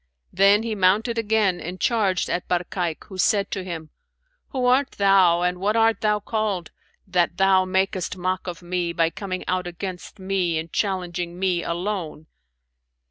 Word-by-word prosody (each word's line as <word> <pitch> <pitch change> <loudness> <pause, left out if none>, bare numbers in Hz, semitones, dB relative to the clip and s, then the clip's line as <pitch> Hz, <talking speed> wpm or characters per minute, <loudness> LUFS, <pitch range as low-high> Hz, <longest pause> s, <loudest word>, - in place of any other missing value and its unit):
Then 200 +3 +5
he 230 -1 -2
mounted 215 +4 +2
again 210 -4 +1
and 180 +3 -6
charged 205 -6 +1
at 175 - -2
Barkayk, 175 -2 -2
who 190 -2 -11
said 200 +1 +2
to 190 - -3
him, 165 -4 -7 0.6
'Who 260 -3 -2
art 255 +2 +3
thou 190 -4 +4
and 180 0 0
what 205 +3 0
art 225 -2 +3
thou 210 -1 +2
called, 205 -4 -2 0.3
that 175 -2 0
thou 190 -1 +4
makest 185 -1 -1
mock 185 +1 -2
of 175 0 -6
me 175 -1 -2
by 165 -1 +1
coming 185 -1 -5
out 185 -1 -1
against 180 +1 -7
me 190 -3 -1
and 160 +1 -5
challenging 180 -3 -2
me, 180 -2 0
alone?' 170 -3 -3
185 Hz, 160 wpm, -23 LUFS, 175-200 Hz, 0.6 s, Then